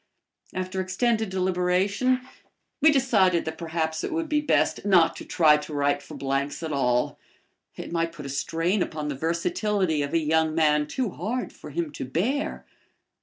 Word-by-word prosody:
After 185 Hz, +1 st, -2 dB
extended 220 Hz, +3 st, 0 dB
deliberation, 190 Hz, +7 st, +1 dB, 0.6 s
we 315 Hz, -, +7 dB
decided 205 Hz, -, +3 dB
that 160 Hz, -, -5 dB
perhaps 160 Hz, -1 st, -2 dB
it -, -, -3 dB
would 325 Hz, 0 st, -1 dB
be 300 Hz, -1 st, +1 dB
best 295 Hz, -, +1 dB
not 185 Hz, -5 st, +4 dB
to -, -, -8 dB
try 155 Hz, -3 st, +5 dB
to 150 Hz, +1 st, -7 dB
write 145 Hz, 0 st, +1 dB
for -, -, -11 dB
Blank's 140 Hz, +3 st, -2 dB
at 160 Hz, -, -3 dB
all. 125 Hz, -3 st, +1 dB, 0.6 s
It -, -, -7 dB
might 165 Hz, -1 st, 0 dB
put 150 Hz, -4 st, -10 dB
a -, -, -5 dB
strain 165 Hz, +7 st, 0 dB
upon 150 Hz, -3 st, -3 dB
the 145 Hz, -, -3 dB
versatility 185 Hz, -, 0 dB
of 145 Hz, +3 st, -2 dB
a -, -, +6 dB
young 160 Hz, 0 st, +1 dB
man 150 Hz, -2 st, +3 dB
too 245 Hz, +3 st, -2 dB
hard 220 Hz, +11 st, -3 dB
for 150 Hz, -, -11 dB
him 160 Hz, +1 st, -3 dB
to -, -, -6 dB
bear. 250 Hz, -, -1 dB
170 Hz, 170 wpm, -26 LUFS, 150-205 Hz, 0.6 s, we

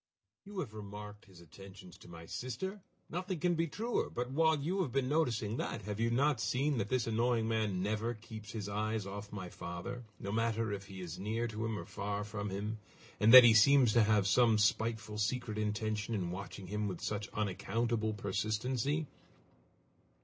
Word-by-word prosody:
You 205 Hz, 0 st, -10 dB
have 120 Hz, -10 st, -6 dB
remarked 105 Hz, 0 st, -9 dB
his 90 Hz, -4 st, -16 dB
attentions 90 Hz, +2 st, -13 dB
to -, -, -14 dB
my 85 Hz, -1 st, -10 dB
sister! 130 Hz, -, -5 dB, 0.3 s
Nothing 180 Hz, 0 st, -3 dB
can 175 Hz, +3 st, +2 dB
be 165 Hz, 0 st, 0 dB
truer! 225 Hz, +10 st, -1 dB
But 125 Hz, +1 st, -4 dB
while 160 Hz, +2 st, +3 dB
you 180 Hz, +7 st, 0 dB
have 150 Hz, -9 st, -2 dB
been 135 Hz, 0 st, +1 dB
noticing 120 Hz, -7 st, 0 dB
that, 110 Hz, -, -3 dB
have 105 Hz, +1 st, -4 dB
you 115 Hz, 0 st, +2 dB
not 130 Hz, 0 st, +2 dB
seen 130 Hz, +7 st, +1 dB
that 105 Hz, 0 st, -2 dB
this 130 Hz, -3 st, +1 dB
annoying 115 Hz, 0 st, +1 dB
man 105 Hz, -5 st, 0 dB
never 110 Hz, +3 st, -1 dB
keeps 110 Hz, -1 st, -10 dB
his 105 Hz, -3 st, -4 dB
eyes 110 Hz, 0 st, -1 dB
off 100 Hz, +1 st, -7 dB
my 95 Hz, -3 st, -5 dB
father, 85 Hz, +9 st, -6 dB, 0.2 s
no 100 Hz, -, -4 dB
matter 115 Hz, 0 st, 0 dB
if 100 Hz, -1 st, -5 dB
he 95 Hz, -2 st, -8 dB
is 90 Hz, 0 st, -6 dB
near 110 Hz, +4 st, -1 dB
to 110 Hz, +1 st, -3 dB
him 110 Hz, -1 st, -2 dB
or -, -, -6 dB
far 100 Hz, +1 st, -3 dB
from 105 Hz, -1 st, -4 dB
him, 105 Hz, +3 st, -4 dB, 0.4 s
and 110 Hz, +2 st, +5 dB
that 130 Hz, +1 st, +13 dB
he 120 Hz, -1 st, +8 dB
seems 120 Hz, +1 st, +6 dB
to 120 Hz, -, +6 dB
have 105 Hz, -2 st, +3 dB
some 110 Hz, +2 st, +4 dB
spiteful 110 Hz, 0 st, 0 dB
secret 110 Hz, 0 st, -1 dB
intention 110 Hz, +1 st, -1 dB
in 90 Hz, -4 st, -2 dB
watching 95 Hz, +1 st, -7 dB
him 105 Hz, +3 st, -2 dB
with 90 Hz, -4 st, -5 dB
such 105 Hz, 0 st, -3 dB
unaccountable 110 Hz, +2 st, -1 dB
persistency?" 110 Hz, +9 st, -1 dB
110 Hz, 185 wpm, -34 LUFS, 100-120 Hz, 0.4 s, that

